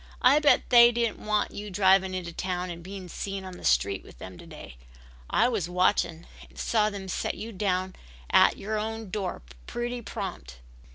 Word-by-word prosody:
I 265 +4 +6
bet 295 -3 +3
they 240 -1 +8
didn't 235 -2 -2
want 210 -1 0
you 210 +1 -7
driving 190 -1 +3
into 175 -2 -5
town 180 0 -3
and 170 0 -8
being 190 +1 -8
seen 195 +2 -5
on 185 -1 -8
the - - -13
street 100 -1 +1
with - - -15
them 95 +7 -9
to - - -12
day. - - -11 0.5
I - - +3
was 210 -9 -1
watching 180 -2 +1 0.2
and - - -21
saw 215 -2 +1
them 200 -2 -7
set - - -2
you 225 +2 -7
down 185 -2 -1 0.4
at - - +5
your 215 +1 -3
own 220 -2 -5
door 195 - -3 0.2
pretty 240 0 -3
prompt." 190 - -6
195 Hz, 185 wpm, -27 LUFS, 180-220 Hz, 0.5 s, they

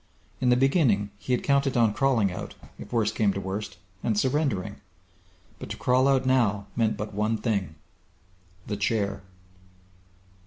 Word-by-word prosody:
In 125 - +2
the 125 - +5
beginning 125 - +2
he 125 - -5
had 125 - +1
counted 140 -2 +2
on 115 -3 +4
crawling 120 -8 +2
out, 90 - -7 0.2
if - - -10
worst 110 -2 +1
came 105 -2 +2
to 100 - -3
worst, 100 +2 -5 0.3
and 110 -3 0
surrendering. 130 -7 0 0.8
But - - -8
to - - -5
crawl 130 +1 +3
out 135 -1 +3
now 110 -6 +2
meant 110 -3 +1
but 105 0 -5
one 105 +2 0
thing 100 -7 -2 0.9
The 105 - -3
Chair! 100 -1 -1
110 Hz, 155 wpm, -26 LUFS, 100-130 Hz, 0.9 s, the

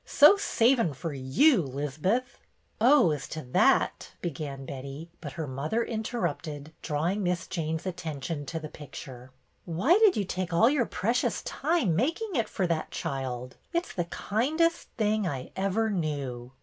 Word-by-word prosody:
So 295 +8 +7
savin' 245 - +3
i&x 140 -4 -8
yoti, 165 - +3
'Liz'beth!" 170 - -1 0.2
" - - -40
Oh, 250 - +6
as 145 -3 -3
to 155 - -6
that 125 - +2
— - - -35
" - - -39
began 140 -4 -4
Betty, 140 +5 -7
but 145 -5 -6
her 160 +1 -4
mother 150 - -1
interrupted, 170 - -3
drawing 165 +7 -1
Miss 180 -1 0
Jane's 160 0 -3
attention 160 -4 -4
to 165 - -3
the 155 - -6
picture. 130 -4 -10 0.2
" - - -42
Why 200 - +3
did 430 -4 +5
you 205 - +1
take 185 -1 -3
all 225 +9 +5
your 270 -6 +1
precious 230 +5 0
time 295 - +1
making 335 - 0
it 230 -4 +1
for 190 - -1
that 165 -2 -1
child.? 130 -2 -4 0.2
It's 340 +1 -1
the 175 - -1
kindest 310 - 0
thing 215 -2 +1
I 135 -6 -4
ever 200 +3 +1
knew." 140 -9 -3
175 Hz, 165 wpm, -28 LUFS, 145-230 Hz, 0.2 s, So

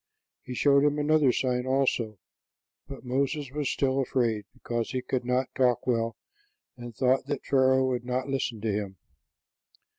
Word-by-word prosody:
He 125 - -7
showed 140 +2 +4
him 145 0 +2
another 150 -2 +3
sign, 125 0 -1
also; 130 -5 0 0.7
but 135 -1 -10
Moses 140 +2 -1
was 145 -1 -2
still 135 -1 0
afraid, 120 -5 0
because 120 -1 -4
he 130 -1 -3
could 130 -1 -2
not 125 +1 -1
talk 125 -2 +2
well 115 -2 0 0.6
and 120 -2 -9
thought 130 +2 +2
that 145 -2 -3
Pharaoh 130 -1 +3
would 125 -2 -1
not 125 +2 -2
listen 130 -5 -2
to 110 -1 0
him. 100 -2 -3
130 Hz, 155 wpm, -27 LUFS, 120-135 Hz, 0.7 s, showed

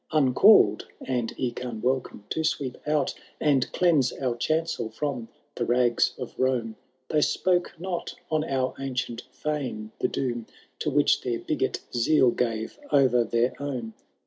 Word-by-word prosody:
Uncalled, 135 - +5
and 125 -3 -2
eke 125 -1 -2
unwelcome, 125 -1 -2
to 160 - 0
sweep 140 -5 -1
out 150 -2 +1 0.3
And 140 -4 +2
cleanse 160 -8 +3
our 125 -3 -2
chancel 155 0 -1
from 125 0 -3 0.3
the - - -2
rags 120 0 +2
of 125 - -6
Rome, 125 -4 0 0.3
They 150 - +2
spoke 175 +4 +1
not 180 -1 -4 0.2
on 155 -1 +2
our 130 -4 -1
ancient 125 -3 -3
feme 130 -6 -4
the - - +2
doom 120 -4 -3 0.3
To 155 - 0
which 145 0 +3
their 120 -2 -1
bigot - - -2
zeal 125 +1 +4
gave 115 - -2
o^er 125 -4 +4
their 120 +2 +2
own. 125 -6 -4
130 Hz, 145 wpm, -26 LUFS, 120-150 Hz, 0.3 s, Uncalled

